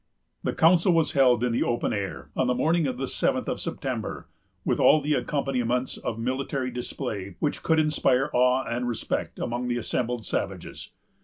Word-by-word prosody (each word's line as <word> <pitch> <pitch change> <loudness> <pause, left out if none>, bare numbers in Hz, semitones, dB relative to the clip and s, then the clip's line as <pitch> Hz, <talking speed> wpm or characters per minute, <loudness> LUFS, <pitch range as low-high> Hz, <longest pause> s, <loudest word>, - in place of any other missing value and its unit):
The - - -1
council 175 +2 +5
was 165 -2 +2
held 125 -4 +4
in 125 - +1
the 115 - 0
open 120 - 0
air, 95 -10 -4
on 130 - +1
the 125 - +2
morning 160 +4 +2
of 125 -1 -3
the 135 +1 -2
seventh - - 0
of - - -2
September, - - -4 0.4
with - - +1
all 155 - +6
the 150 +1 0
accompaniments 125 -2 0
of 115 - -4
military 130 +2 -2
display 110 -6 -5
which 145 - -1
could 160 - +2
inspire 145 -4 +2
awe 125 +1 +3
and 120 +1 -2
respect 120 -2 -3
among 120 +1 -2
the 120 0 0
assembled 120 -1 -2
savages. - - -4
125 Hz, 175 wpm, -26 LUFS, 120-140 Hz, 0.4 s, all